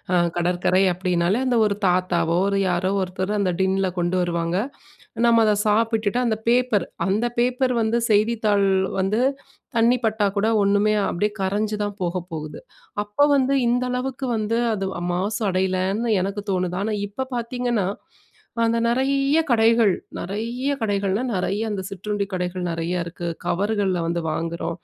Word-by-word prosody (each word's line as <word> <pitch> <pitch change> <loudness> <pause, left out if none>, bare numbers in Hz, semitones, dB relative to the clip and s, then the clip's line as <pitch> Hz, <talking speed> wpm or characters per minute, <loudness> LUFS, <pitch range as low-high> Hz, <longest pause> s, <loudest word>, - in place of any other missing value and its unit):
ஆ - - +3 0.2
கடற்கரை 180 +2 +2
அப்படினாலே 180 +3 0
அந்த 250 -2 +2
ஒரு 205 -1 +1
தாத்தாவோ, 175 -2 +1
ஒரு 200 - +1
யாரோ 180 +1 0
ஒருத்தர் 185 +2 -3
அந்த 195 -2 +1
டின்னில 190 0 +1
கொண்டு 175 +1 0
வருவாங்க. 170 0 -1 0.7
நம்ம 230 -1 +5
அத 210 - +4
சாப்பிட்டுட்டு 220 +1 +1
அந்த 220 -2 +1
பேப்பர் 240 -6 +2 0.2
அந்த 205 +5 +1
பேப்பர் 250 +1 +1
வந்து 225 +2 +1
செய்தித்தாள் 210 -2 +2 0.3
வந்து 200 +5 +1 0.6
தண்ணி 235 +2 +4
பட்டா 220 -1 +1
கூட 210 +2 +2 0.2
ஒண்ணுமே 205 +2 +3 0.2
அப்படியே 205 +4 0
கரைஞ்சு 210 +3 0
தான் 205 0 -4
போக 175 +1 -2 0.2
போகுது. 155 -1 -6 0.4
அப்ப 210 +8 +2
வந்து 270 0 +2
இந்த 245 +1 +2
அளவுக்கு 260 +1 -3
வந்து 215 +2 -1 0.2
அது 195 -2 -2 0.3
மாசு 205 +5 -2
அடையலன்னு 190 +4 0
எனக்கு 200 +1 -3
தோணுது. 180 -1 -1
ஆனா 215 +1 -1
இப்ப 260 +6 -5
பார்த்தீங்கன்னா, 235 -4 -1 0.8
அந்த 230 0 +2
நிறைய 275 +4 +2
கடைகள், 225 -3 +4 0.3
நிறைய 235 +8 -3
கடைகள்னா 200 0 0
நிறைய 200 +2 -1
அந்த 200 -2 -3
சிற்றுண்டி 200 +1 -3
கடைகள் 180 0 -3
நிறையா 170 +2 -2
இருக்கு. 170 0 -7 0.2
கவர்கள்ல 195 0 0
வந்து 170 +1 -1
வாங்குறோம். 165 +1 -3
205 Hz, 145 wpm, -23 LUFS, 185-230 Hz, 0.8 s, நம்ம